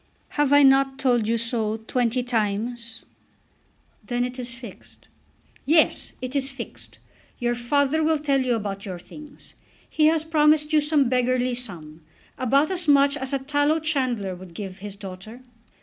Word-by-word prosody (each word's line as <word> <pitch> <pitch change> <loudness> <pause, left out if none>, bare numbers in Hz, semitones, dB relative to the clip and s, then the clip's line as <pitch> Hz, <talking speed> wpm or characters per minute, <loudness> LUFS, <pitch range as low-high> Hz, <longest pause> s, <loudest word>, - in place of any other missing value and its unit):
"Have 290 -2 0
I 285 0 +7
not 270 0 +4
told 245 -5 +1
you 230 +1 +1
so 225 -2 -1
twenty 245 +2 -1
times?" 230 0 -2 1.0
"Then 245 -1 -1
it 250 +1 -7
is 240 -1 -5
fixed." 235 -5 -13 0.6
"Yes; 315 +2 +2
it 255 +2 -4
is 270 -1 +1
fixed. 270 - -9 0.4
Your 240 -1 0
father 285 +6 +1
will 315 0 +2
tell 280 -2 +1
you 250 -2 +1
about 200 -2 -4
your 185 -3 -6
things. 295 +11 -13 0.3
He 305 -1 +2
has 320 0 +2
promised 305 -1 +3
you 305 - +5
some 295 -3 +2
beggarly 250 0 +1
sum, 165 -10 -6 0.3
about 275 +6 +2
as 355 -2 -1
much 280 -1 +5
as 265 -2 -4
a 275 - +1
tallow 290 +3 +1
chandler 255 -11 -1
would 180 -1 -12
give 195 -1 -7
his 200 0 -8
daughter." 200 +5 -10
255 Hz, 160 wpm, -24 LUFS, 225-290 Hz, 1.0 s, I